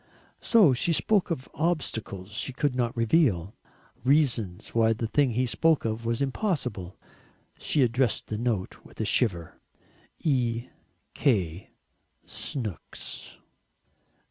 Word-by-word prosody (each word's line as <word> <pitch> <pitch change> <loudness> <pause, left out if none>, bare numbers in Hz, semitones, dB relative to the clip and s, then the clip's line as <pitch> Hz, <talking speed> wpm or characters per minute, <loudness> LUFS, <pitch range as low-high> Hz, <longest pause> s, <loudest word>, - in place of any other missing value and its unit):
So 205 - +5
she 165 +7 +1
spoke 200 +3 +2
of 130 -6 -3
"obstacles 115 - -2
she 125 +5 -3
could 140 +1 0
not 120 0 -1
reveal" 115 - +2 0.5
"reasons 120 - +1
why 115 -1 +4
the 115 +1 -3
thing 140 +4 +2
he 125 +3 +1
spoke 160 +4 +2
of 110 +1 -2
was 115 +4 0
impossible." 130 - -2 0.6
She 145 - +2
addressed 120 0 +1
the 110 - -4
note 115 -6 -2
with - - -17
a - - 0
shiver, 85 -9 0 0.6
"E. 120 -5 0 0.4
K. 95 - 0 0.6
Snooks." 110 - -5
120 Hz, 115 wpm, -27 LUFS, 110-140 Hz, 0.6 s, So